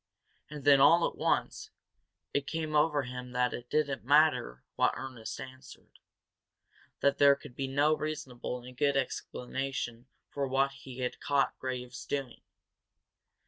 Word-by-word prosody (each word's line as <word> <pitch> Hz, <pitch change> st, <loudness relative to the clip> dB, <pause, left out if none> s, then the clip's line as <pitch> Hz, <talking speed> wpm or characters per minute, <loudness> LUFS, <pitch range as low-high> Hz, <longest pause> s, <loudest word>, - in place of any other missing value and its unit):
And 150 Hz, -2 st, -8 dB
then, 140 Hz, -1 st, +7 dB
all 165 Hz, +5 st, +6 dB
at -, -, -7 dB
once, -, -, -1 dB, 0.6 s
it 140 Hz, -1 st, 0 dB
came 155 Hz, -1 st, -2 dB
over 150 Hz, -1 st, +3 dB
him 125 Hz, 0 st, -7 dB
that 125 Hz, 0 st, +1 dB
it 120 Hz, 0 st, -7 dB
did 155 Hz, -1 st, +2 dB
not 140 Hz, -1 st, -4 dB
matter 145 Hz, -, +3 dB
what -, -, +2 dB
Ernest 130 Hz, -4 st, -6 dB
answered, 130 Hz, 0 st, -12 dB, 1.0 s
that 140 Hz, -, +2 dB
there 140 Hz, -1 st, +7 dB
could 125 Hz, -3 st, -13 dB
be 135 Hz, -, -2 dB
no 145 Hz, +3 st, +3 dB
reasonable 130 Hz, -5 st, -5 dB
and 125 Hz, +1 st, -11 dB
good 140 Hz, +2 st, +2 dB
explanation 130 Hz, -2 st, -3 dB, 0.2 s
for 140 Hz, -1 st, -3 dB
what 135 Hz, +1 st, +2 dB
he 130 Hz, -2 st, -10 dB
had 125 Hz, -, -3 dB
caught 140 Hz, -1 st, +1 dB
Graves 125 Hz, -1 st, -5 dB
doing. 135 Hz, -4 st, -3 dB
135 Hz, 145 wpm, -31 LUFS, 125-145 Hz, 1.0 s, then